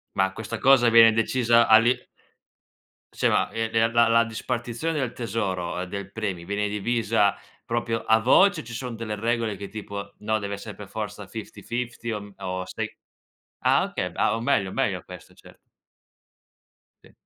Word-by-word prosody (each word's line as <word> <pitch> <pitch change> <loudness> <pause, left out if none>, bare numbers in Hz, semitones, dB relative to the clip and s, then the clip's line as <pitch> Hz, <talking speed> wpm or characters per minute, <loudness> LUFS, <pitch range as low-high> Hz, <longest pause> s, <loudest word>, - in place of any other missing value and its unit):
Ma 95 0 +1
questa 110 +2 -5
cosa 125 -2 +5
viene 115 -1 +7
decisa 115 +1 +3
all'i 115 +3 +6 1.2
Sì, - - +1
ma - - +2
e 115 0 -2
de 115 0 +3
la 115 0 +4
la 115 +1 +5
dispartizione 120 +6 -3
del 130 -3 -2
tesoro, 95 -6 -3
del 100 +1 -7
premio, 100 -6 -4
viene 100 +2 -1
divisa 105 -1 +1 0.3
proprio 115 -1 -2
a 110 0 +4
voce? 170 - +4
O - - -14
ci 120 0 -10
son 125 0 -5
delle 110 -1 -4
regole 115 0 -1
che 100 +1 -7
tipo: 100 -1 -7
"No, 110 +1 0
deve 100 -1 -4
essere 100 - -9
per - - -10
forza - - -5
fifty-fifty" 120 -1 -5
o 105 -2 -3
mhmm, 100 0 -12
o 95 -1 -4
sei - - -5 0.6
Ah, - - +3
okay. - - -3
Ah, 110 - +2
o 115 - -4
meglio, 105 -7 +1
meglio - - -1
questo, - - -12
cert - - -17 1.5
Sì. - - -19
115 Hz, 165 wpm, -25 LUFS, 100-120 Hz, 1.5 s, viene